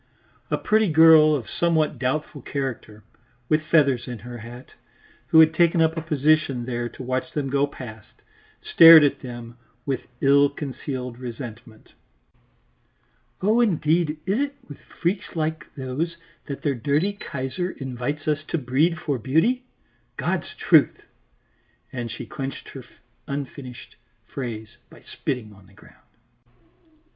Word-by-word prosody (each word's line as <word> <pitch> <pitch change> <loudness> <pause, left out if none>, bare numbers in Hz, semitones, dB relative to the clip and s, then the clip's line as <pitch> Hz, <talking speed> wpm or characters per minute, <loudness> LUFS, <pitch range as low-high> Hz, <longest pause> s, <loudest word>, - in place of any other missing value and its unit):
A - - 0
pretty 215 -2 +2
girl 155 -1 +7
of 125 -6 -4
somewhat 160 -3 0
doubtful 145 +2 -2
character, 120 -6 -5 0.5
with 155 0 +3
feathers 140 -6 +2
in 120 -1 -5
her 120 +3 -9
hat, 120 +3 -11 0.6
who 160 - +5
had 160 0 +7
taken 170 +1 +3
up 160 0 +3
a 165 - -3
position 150 -4 +1
there 120 -1 -3
to 130 - -10
watch 130 0 -2
them 140 -3 -2
go 140 +1 +2
past, 110 -6 -11 0.5
stared 165 -2 +9
at 140 -1 +1
them 120 -1 -9 0.3
with 135 -3 -3
ill 140 +1 +5
concealed 130 -3 -6
resentment. 115 -2 -9 1.5
"Oh 215 +4 +3
indeed, 165 -6 +1
is 195 +6 0
it 280 0 -2
with 145 - -11
freaks 180 +2 -4
like 160 -1 -2
those 145 +6 -3 0.3
that 140 - -6
their 145 - +1
dirty 145 - 0
Kaiser 175 -2 -4
invites 135 +1 -5
us 155 0 0
to 170 - -2
breed 150 +5 +1
for 140 -4 -2
beauty? 200 - +1 0.5
God's - - -2
truth!" - - +3 0.9
and 120 -2 -4
she 120 - -7
clinched 135 +2 -6
her 135 - -9 0.4
unfinished 140 -3 -7 0.3
phrase 110 -5 -7
by - - -17
spitting 110 -5 -5
on 100 -1 -19
the 100 - -21
ground. - - -20
140 Hz, 135 wpm, -24 LUFS, 125-160 Hz, 1.5 s, stared